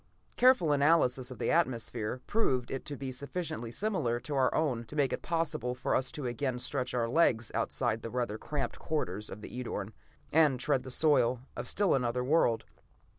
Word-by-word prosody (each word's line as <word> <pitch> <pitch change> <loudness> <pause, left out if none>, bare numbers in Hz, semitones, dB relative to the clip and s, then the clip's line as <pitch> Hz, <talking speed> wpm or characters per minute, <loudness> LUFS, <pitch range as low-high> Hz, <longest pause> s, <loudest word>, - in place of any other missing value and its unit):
"Careful 250 - +5
analysis 140 -4 +3
of 130 - -8
the - - 0
atmosphere 125 -6 0
proved 130 - 0
it 135 - -4
to 145 - -5
be 135 -1 -4
sufficiently 140 -2 -4
similar 155 - -1
to 150 - -5
our 135 -2 +3
own 130 -7 0
to 130 - -10
make 140 -3 +2
it - - -3
possible 155 -7 -1
for 125 - -1
us 130 0 +1
to 145 - -5
again 125 +1 -1
stretch 125 0 -2
our 115 -2 +1
legs 120 -5 +2
outside 110 - -1
the 115 - -5
rather 120 -3 -2
cramped 145 -2 -3
quarters 105 -9 -2
of 105 - -8
the - - -9
Edorn, 110 -3 -4 0.4
and 150 -5 +4
tread 130 - +1
the 130 - -9
soil 130 -4 +3
of - - -4
still 200 -2 +2
another 125 -1 0
world. 125 -5 +2
130 Hz, 185 wpm, -31 LUFS, 120-150 Hz, 0.4 s, Careful